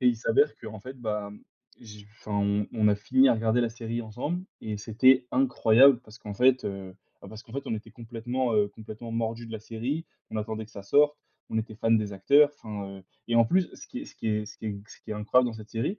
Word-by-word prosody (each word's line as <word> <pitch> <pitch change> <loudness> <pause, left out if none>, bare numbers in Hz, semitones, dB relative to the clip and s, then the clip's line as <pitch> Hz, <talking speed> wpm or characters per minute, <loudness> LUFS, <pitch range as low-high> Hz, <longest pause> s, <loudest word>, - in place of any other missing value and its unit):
Et 125 - +2
il 120 - +2
s'avère 115 +6 +3
qu'en 110 -2 -8
fait, 130 +4 -9
bah, 105 -3 -3 0.5
j 105 -3 -12
enfin, 105 - -8
on 100 0 +1
on 110 -2 +3
a 105 - +4
fini 130 +6 +4
à 120 - +5
regarder 115 +2 +1
la 120 - +1
série 115 0 -4
ensemble 145 - -4 0.2
et 105 -1 -4
c'était 125 +5 +4
incroyable 130 0 +5
parce 110 +2 -14
qu'en 105 -1 -7
fait, 130 +3 +4
heu 95 -2 -5 0.3
bah, 100 - -10
parce 110 +3 -10
qu'en 115 - -17
fait, 140 +1 -5
on - - -1
était 110 +1 -8
complètement, 120 +2 -3
heu, 105 -1 +3
complètement 110 +2 -9
mordus 115 0 -2
de 115 - -10
la 110 - -4
série, 125 +9 -4 0.2
on 110 - -4
attendait 110 +1 -3
que - - -21
ça 100 - -9
sorte, 145 +8 +4 0.3
on 110 - 0
était 110 0 -4
fans 115 +1 -1
des 105 -2 +2
acteurs, 145 +9 +5
enfin, 100 -3 -6
heu - - -15 0.3
et 115 - 0
en 115 - +7
plus, 180 +7 +2
ce - - -12
qui 255 - -7
est 290 - -7
ce - - -14
qui - - -6
est 105 0 0
ce 105 - -12
qui 110 - -7
est 100 -1 -3
ce - - -14
qui - - -11
est - - -2
incroyable 125 +4 +3
dans 115 - -8
cette 110 0 -11
série 165 - -2
110 Hz, 255 wpm, -28 LUFS, 105-125 Hz, 0.5 s, en